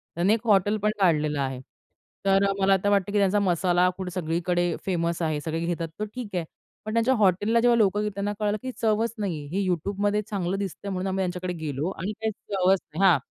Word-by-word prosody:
त्यानी 180 Hz, +5 st, +3 dB
एक 230 Hz, +1 st, -2 dB
हॉटेल 205 Hz, 0 st, +4 dB
पण 210 Hz, -, +3 dB
काढलेलं 155 Hz, -5 st, +2 dB
आहे. 130 Hz, -1 st, -2 dB, 0.7 s
तर 195 Hz, 0 st, +4 dB, 0.2 s
मला 195 Hz, 0 st, +4 dB
आता 195 Hz, +2 st, +1 dB
वाटतं 200 Hz, -1 st, +2 dB
की 210 Hz, -, +1 dB
त्यांचा 200 Hz, 0 st, +3 dB
मसाला 180 Hz, -1 st, +2 dB
फूड 190 Hz, -1 st, -4 dB
सगळीकडे 175 Hz, 0 st, -1 dB
फेमस 170 Hz, -2 st, -1 dB
आहे. 155 Hz, -2 st, 0 dB
सगळे 160 Hz, +1 st, -3 dB
घेतात 170 Hz, -1 st, -2 dB
तर 215 Hz, -, -1 dB
ठीक 245 Hz, -4 st, -5 dB
आहे. 175 Hz, -2 st, -1 dB, 0.4 s
पण 215 Hz, -, -4 dB
त्यांच्या 230 Hz, +3 st, +3 dB
हॉटेलला 205 Hz, +2 st, +3 dB
जेव्हा 240 Hz, 0 st, +4 dB
लोकं 205 Hz, -2 st, +3 dB
गेली 210 Hz, -, 0 dB
त्यांना 200 Hz, +1 st, -2 dB
कळालं 210 Hz, 0 st, 0 dB
की 260 Hz, -, -4 dB
चवच 225 Hz, +1 st, +1 dB
नाही 195 Hz, -6 st, -2 dB
आहे. 145 Hz, -, -9 dB
हे 200 Hz, 0 st, +1 dB
YouTubeमध्ये 200 Hz, +4 st, 0 dB
चांगलं 190 Hz, -2 st, -1 dB
दिसतंय 200 Hz, 0 st, -5 dB
म्हणून 185 Hz, 0 st, -2 dB
आम्ही 190 Hz, 0 st, -1 dB
त्यांच्याकडे 180 Hz, 0 st, -2 dB
गेलो 155 Hz, -1 st, -3 dB
आणि 190 Hz, +1 st, -4 dB
काही 220 Hz, 0 st, 0 dB
चवच 190 Hz, -2 st, +1 dB, 0.2 s
नाही 190 Hz, -, 0 dB
हां. 170 Hz, -, +5 dB
190 Hz, 210 wpm, -26 LUFS, 175-205 Hz, 0.7 s, हां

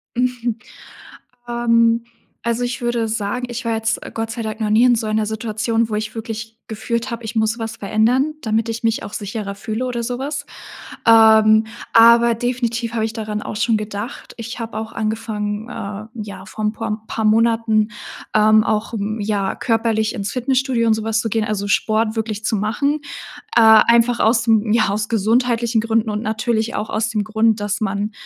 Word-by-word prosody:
Mhm. 245 Hz, -2 st, -1 dB, 0.9 s
Ähm, 230 Hz, -1 st, +2 dB, 0.4 s
also, 235 Hz, +1 st, -1 dB
ich 245 Hz, 0 st, -3 dB
würde 240 Hz, -1 st, 0 dB
sagen, 220 Hz, +3 st, -2 dB
ich 240 Hz, +1 st, -5 dB
war 230 Hz, -1 st, 0 dB
jetzt, 225 Hz, 0 st, -1 dB
äh, -, -, -9 dB
Gott 225 Hz, 0 st, -3 dB
sei 230 Hz, -, -5 dB
Dank 220 Hz, +1 st, -5 dB
noch 210 Hz, -, 0 dB
nie 225 Hz, +3 st, +5 dB
in 245 Hz, -1 st, +5 dB
so 220 Hz, -1 st, -2 dB
einer 215 Hz, 0 st, 0 dB
Situation, 220 Hz, +1 st, -1 dB
wo 215 Hz, -, -2 dB
ich 215 Hz, +1 st, -4 dB
wirklich 225 Hz, 0 st, -6 dB
gefühlt 235 Hz, +3 st, -3 dB
habe, 235 Hz, 0 st, -5 dB
ich 220 Hz, +2 st, -6 dB
muss 220 Hz, +2 st, +1 dB
was 225 Hz, 0 st, -4 dB
verändern, 235 Hz, +9 st, +1 dB
damit 225 Hz, -1 st, 0 dB
ich 225 Hz, 0 st, -4 dB
mich 225 Hz, 0 st, 0 dB
auch -, -, -7 dB
sicherer 200 Hz, -1 st, -5 dB
fühle 220 Hz, +4 st, -4 dB
oder 240 Hz, -2 st, -3 dB
sowas. 275 Hz, +5 st, -4 dB, 0.6 s
Ähm, 220 Hz, -1 st, +6 dB, 0.3 s
aber 235 Hz, +1 st, +7 dB
definitiv 235 Hz, -1 st, -2 dB
habe 225 Hz, -, 0 dB
ich 220 Hz, -, -3 dB
daran 215 Hz, -2 st, -4 dB
auch 210 Hz, -, -5 dB
schon 225 Hz, +1 st, +2 dB
gedacht. 210 Hz, +3 st, -6 dB
Ich 230 Hz, +2 st, -6 dB
habe 225 Hz, -1 st, -5 dB
auch 220 Hz, +1 st, -5 dB
angefangen, 215 Hz, 0 st, -3 dB
äh, 210 Hz, -2 st, -6 dB
ja, 200 Hz, -4 st, -7 dB
vor 215 Hz, +3 st, -7 dB
ein 210 Hz, -, +2 dB
pur -, -, -5 dB
M 215 Hz, 0 st, -2 dB
paar 220 Hz, -, -2 dB
Monaten, 225 Hz, 0 st, +3 dB, 0.4 s
ähm, 215 Hz, 0 st, +5 dB
auch, 215 Hz, +1 st, -1 dB
hm, 215 Hz, +1 st, -3 dB
ja 200 Hz, -2 st, -1 dB
körperlich 225 Hz, -2 st, 0 dB
ins 200 Hz, 0 st, -3 dB
Fitnessstudio 255 Hz, -2 st, 0 dB
und 220 Hz, -, +5 dB
sowas 220 Hz, 0 st, -1 dB
zu -, -, -2 dB
gehen, 220 Hz, +1 st, 0 dB
also 205 Hz, -2 st, -2 dB
Sport 220 Hz, +2 st, +1 dB
wirklich 220 Hz, -1 st, -3 dB
zu 220 Hz, -, +1 dB
machen. 280 Hz, +9 st, 0 dB, 0.6 s
Äh, -, -, +7 dB
einfach 230 Hz, +2 st, +6 dB
aus, 225 Hz, +1 st, +2 dB
hm, 220 Hz, -1 st, +3 dB
ja, 220 Hz, -2 st, +3 dB
aus 210 Hz, +1 st, -2 dB
gesundheitlichen 230 Hz, +1 st, +1 dB
Gründen 225 Hz, -1 st, 0 dB
und 210 Hz, 0 st, -2 dB
natürlich 220 Hz, +1 st, -1 dB
auch 215 Hz, -, -3 dB
aus 220 Hz, 0 st, -1 dB
dem 210 Hz, -2 st, -1 dB
Grund, 220 Hz, 0 st, +2 dB
dass 205 Hz, +1 st, -2 dB
man, 205 Hz, +1 st, -1 dB
225 Hz, 190 wpm, -20 LUFS, 215-235 Hz, 0.9 s, aber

